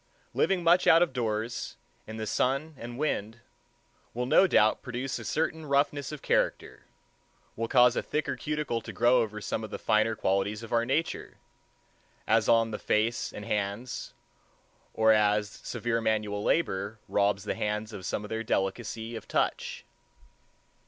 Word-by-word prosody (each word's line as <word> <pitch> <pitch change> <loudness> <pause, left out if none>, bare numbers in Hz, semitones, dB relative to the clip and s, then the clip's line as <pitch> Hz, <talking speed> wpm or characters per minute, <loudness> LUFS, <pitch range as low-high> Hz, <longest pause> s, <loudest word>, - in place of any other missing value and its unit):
Living 190 -2 +1
much 170 +2 +4
out 165 +1 +7
of 170 - -2
doors, 115 -1 -3 0.3
in 110 - -7
the 110 - -3
sun 140 +8 0
and 120 +1 -7
wind, 115 -6 -2 0.7
will 125 +1 -1
no 155 +9 +5
doubt 110 -9 +3
produce 125 +1 -4
a - - -7
certain 160 +1 -1
roughness 140 -1 0
of 150 - -8
character—will 115 +1 -4
cause 125 -1 +5
a - - +1
thicker 150 -2 -2
cuticle 145 -3 -2
to - - -8
grow 120 +1 +4
over 105 -1 -3
some 110 +1 -3
of 110 - -6
the - - -5
finer 110 0 +2
qualities 100 +2 0
of 115 - -7
our 115 0 +3
nature, 150 +6 -2 0.9
as - - +2
on 115 -1 +4
the 105 - -4
face 110 +3 0
and 105 - -8
hands, 105 +3 -3 0.8
or 110 0 +5
as 105 -1 +3
severe 115 +2 -3
manual 105 -2 -1
labor 100 - 0
robs 100 0 +1
the 105 - -2
hands 105 +1 -3
of 95 - -7
some 100 - -3
of - - -10
their 110 0 -3
delicacy 110 +2 -2
of - - -8
touch. - - -1
115 Hz, 160 wpm, -28 LUFS, 105-130 Hz, 0.9 s, out